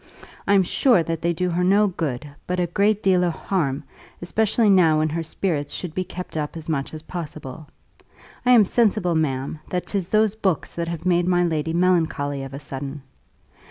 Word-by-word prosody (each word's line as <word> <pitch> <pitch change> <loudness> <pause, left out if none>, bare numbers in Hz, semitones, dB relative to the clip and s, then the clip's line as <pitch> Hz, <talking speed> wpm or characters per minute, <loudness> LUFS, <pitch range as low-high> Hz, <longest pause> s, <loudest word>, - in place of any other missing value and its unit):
I'm 200 -1 +5
sure 230 - +3
that 165 0 -3
they 170 - +1
do 180 +2 -1
her 175 +1 0
no 200 +3 +4
good, 150 -8 -3 0.2
but 180 0 -1
a 175 - +2
great 205 +5 +1
deal 185 -2 +4
of 175 -2 +1
harm, 155 -8 -1 0.4
especially 220 +5 +1
now 180 -6 +5
when 155 0 +1
her 165 +2 -2
spirits 160 -3 -2
should 175 -4 -5
be 185 - -1
kept 180 -1 -8
up 150 +1 -3
as 160 - -8
much 145 -4 -2
as 155 0 -8
possible. 155 -3 -7 0.8
I 250 - +1
am 225 -4 +7
sensible, 210 -5 +2
ma'am, 140 -2 -1
that 180 -1 -2
'tis 195 -4 -2
those 215 0 +2
books 190 -8 -1
that 170 0 -3
have 170 0 -5
made 175 -1 +2
my 175 -1 +3
lady 160 -1 -1
melancholy 160 -5 +1
of 135 0 -7
a - - -6
sudden. 140 0 -7
170 Hz, 195 wpm, -23 LUFS, 155-185 Hz, 0.8 s, am